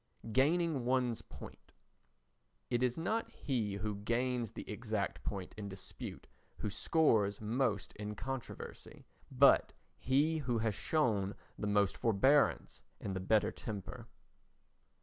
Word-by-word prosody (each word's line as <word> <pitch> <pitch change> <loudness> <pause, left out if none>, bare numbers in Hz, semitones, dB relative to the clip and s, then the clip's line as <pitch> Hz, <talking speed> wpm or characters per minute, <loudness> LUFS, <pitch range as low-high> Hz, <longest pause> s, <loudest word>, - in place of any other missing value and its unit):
Gaining 150 +3 +2
One's 125 -2 +1
Point - - -12 1.0
It 120 - +2
is 125 -1 +1
not 220 +8 -1
he 110 -7 -2
who 105 0 -3
gains 120 +2 -1
the - - -8
exact 110 -2 -2
point 95 -3 -4
in 105 -1 -5
dispute 95 -1 -8 0.3
who 105 - -3
scores 110 - +2
most 110 -2 0
in 105 0 -5
controversy, 130 +3 -7 0.2
but - - +5 0.3
he 150 +5 +2
who 125 -5 0
has 110 -1 +1
shown 105 -5 +1 0.2
the 105 - -3
most 100 -1 +2
forbearance 130 +7 +3 0.2
and 95 - -4
the - - -1
better 105 +3 +2
temper. 105 -4 -7
115 Hz, 125 wpm, -35 LUFS, 105-130 Hz, 1.0 s, but